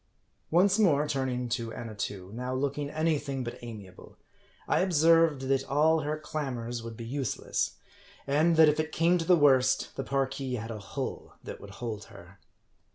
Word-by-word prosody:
Once 190 +5 +4
more 150 -8 +3
turning 130 -3 -1
to 120 -1 -2
Ajinatoo, 100 -4 -6
now 125 +2 -3
looking 140 +2 -2
any 155 0 +1
thing 135 -3 -4
but 120 - -6
amiable, 105 -6 -11 0.5
I - - +2
observed, 165 -4 +4
that 135 0 +1
all 155 +3 +3
her 150 +1 -2
clamors 125 -6 -4
would 115 -1 -8
be 115 - -7
useless; 130 0 -2 0.5
and 155 +4 +3
that 160 -1 +7
if 150 +1 +2
it 155 0 -1
came 170 +3 +3
to 165 - -2
the 180 - +6
worst, 130 -4 +3
the - - -3
Parki 135 -1 -2
had 115 +1 -6
a 110 - -6
hull 100 - -6
that - - -8
would 100 - -10
hold 110 -3 -5
her. 95 -3 -15
135 Hz, 170 wpm, -29 LUFS, 120-155 Hz, 0.5 s, that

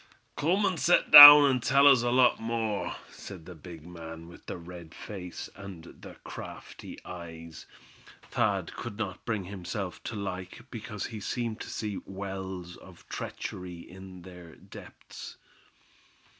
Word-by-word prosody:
"Cum 185 +7 0
an' 190 -3 -1
set 175 +3 +2
down 145 -1 +12
an' 130 -2 +1
tell 140 +4 +3
us 135 -4 +6
a 120 - -1
lot 125 0 +3
more," 115 -2 -3 0.2
said 90 -5 -11
the 90 - -10
big 80 0 -13
man, 85 -1 -10
with 85 - -16
the - - -6
red 85 -1 -12
face, 90 -4 -8
and 100 -4 -11
the - - -14
crafty - - -10
eyes, 85 -2 -10 0.6
Thad - - -1
could 100 - -8
not 100 -3 -6
bring 110 -5 -3
himself 95 0 -7
to 115 - -5
like, 90 -1 -7
because 110 -3 -7
he 110 -3 -8
seemed 115 +2 -4
to - - -8
see 105 -3 -5
wells 95 -2 -8
of - - -17
treachery 90 -2 -7
in 95 -1 -13
their 90 -2 -13
depths. - - -13
95 Hz, 145 wpm, -28 LUFS, 90-115 Hz, 0.6 s, down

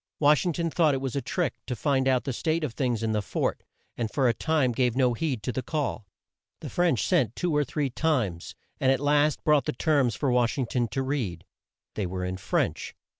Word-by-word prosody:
Wash 150 +4 +4
ing 175 - +1
ton 165 +1 -2
thought 155 -4 +3
it - - -1
was 135 -1 -4
a 140 - 0
trick 175 -2 -1
to 125 - -2
find 135 +2 +1
out 130 -2 +2
the 135 - -3
state 160 +6 -1
of 140 -7 -2
things 120 -4 -1
in 110 - 0
the 105 -1 0
fort, - - -2 0.3
and 115 -2 -2
for 135 +2 +1
a 120 - +3
time 150 -2 +1
gave 125 0 +1
no 130 -2 +3
heed 130 -3 -2
to 125 - -1
the 130 - -2
call. 140 -8 -3 0.5
The - - -7
French 175 -9 +2
sent 130 - +1
two 175 -4 -1
or 150 - +3
three 145 0 -2
times, 120 - -1 0.2
and 130 - +3
at 135 - +2
last 145 +1 +2
brought 150 -4 +3
the - - -1
terms 135 -4 +2
for 135 +3 0
Wash 125 0 +2
ing 130 - 0
ton 120 0 -1
to 135 +6 -2
read. 120 - -3 0.5
They 100 -4 -2
were 90 0 -4
in 90 0 -3
French. - - -2
130 Hz, 230 wpm, -27 LUFS, 120-150 Hz, 0.5 s, Wash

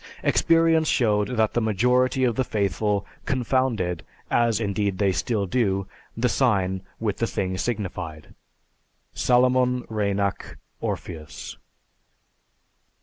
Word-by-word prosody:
Experience 165 -1 +3
showed 105 -7 +2
that 110 -1 +2
the 120 - +1
majority 125 +5 +2
of 120 -3 +2
the 130 - +1
faithful 105 -2 0 0.2
confounded 125 - 0 0.3
(as 115 -2 +2
indeed 100 -2 -1
they 100 -1 +2
still 105 +1 -1
do) 95 -2 0 0.3
the 120 +2 +2
sign 95 -7 +1 0.2
with 105 -3 -1
the 115 - 0
thing 95 -3 -2
signified." 90 -8 -4 0.8
(_Salomon 125 0 +3
Reinach, 100 -2 -1 0.2
"Orpheus." 80 -3 -6
110 Hz, 105 wpm, -24 LUFS, 100-125 Hz, 0.8 s, Experience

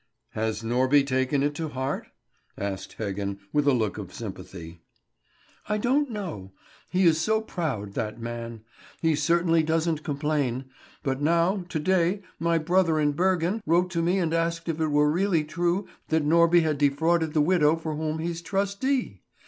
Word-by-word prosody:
"Has 110 0 -2
Norby 130 +4 +3
taken 130 +1 +1
it 145 +1 +1
to 160 +1 -4
heart?" 130 0 -3 0.5
asked 100 -1 -5
Heggen, 100 -2 -3 0.2
with 150 -1 +2
a - - +6
look 110 -4 0
of 95 -3 -7
sympathy. 90 -5 -8 0.9
"I 210 - +1
don't 265 +6 +1
know; 165 - -6 0.4
he 185 +1 +1
is 160 -1 +4
so 220 +5 +2
proud, 140 - -4
that 110 +2 -3
man. 115 -1 -6 0.4
He 160 -1 +2
certainly 165 +2 +2
doesn't 160 0 0
complain. 145 -4 -1 0.4
But 135 -1 -1
now, 170 +5 +2
to 160 - -2
day, 185 +4 +1 0.2
my 170 0 +2
brother 165 0 +2
in 150 -1 +2
Bergen 180 +5 +1
wrote 175 +2 +3
to 170 -1 0
me 175 +3 +2
and 165 -4 0
asked 165 0 -1
if 165 -1 -2
it 160 - +2
were 150 0 +3
really 175 -1 +2
true 175 +5 -1 0.2
that 160 -1 +1
Norby 170 +2 +5
had 155 -3 0
defrauded 160 +3 +2
the - - +4
widow 160 -1 +4
for 160 -1 -4
whom 155 0 -2
he's 170 +1 -3
trustee! 200 - -1
160 Hz, 165 wpm, -26 LUFS, 135-170 Hz, 0.9 s, a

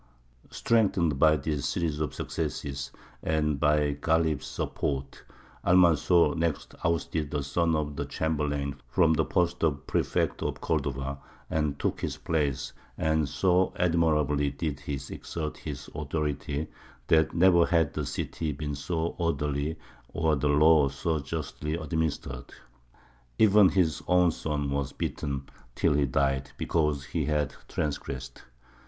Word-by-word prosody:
Strengthened 95 - +2
by 80 0 +6
this 75 0 -2
series 80 -3 -1
of 75 -2 -2
successes, 70 -1 -3 0.3
and 75 -2 0
by 75 0 +3
Ghālib's 80 +1 +1
support, 70 -1 -3 0.4
Almanzor 85 -1 +5
next 85 -2 -2
ousted 80 -2 0
the 75 -1 -2
son 85 +3 +1
of 75 -1 -2
the - - -3
chamberlain 75 -3 -2
from 80 +6 +3
the - - +2
post 90 -1 0
of 70 -3 0
prefect - - 0
of - - -2
Cordova, 70 -2 -2 0.3
and 75 -2 0
took - - -2
his - - -3
place; 75 -5 -1 0.2
and 80 -2 +1
so 90 +3 +2
admirably 75 -5 +2
did 70 0 -3
he 70 +1 -5 0.2
exert 75 -2 -5
his - - -7
authority, 75 -1 -2 0.4
that 80 +4 +3
never 85 -1 +5
had 80 -4 +2
the - - -3
city 80 -2 -3
been 75 +1 -4
so 80 +3 -2
orderly 75 -2 -1 0.4
or 80 -2 +2
the 75 +1 0
law 75 0 +5
so 75 +4 -1
justly 75 +1 -4
administered. 80 -5 -3 0.9
Even 105 -2 +6
his 90 -5 +1
own 90 -1 +4
son 75 -3 -2
was 70 -1 -2
beaten, 70 -2 -3 0.3
till - - +2
he 70 -1 +2
died, 70 +1 0
because 75 -4 0
he - - -2
had 75 -3 0
transgressed. 70 -3 -4
75 Hz, 135 wpm, -28 LUFS, 70-80 Hz, 0.9 s, by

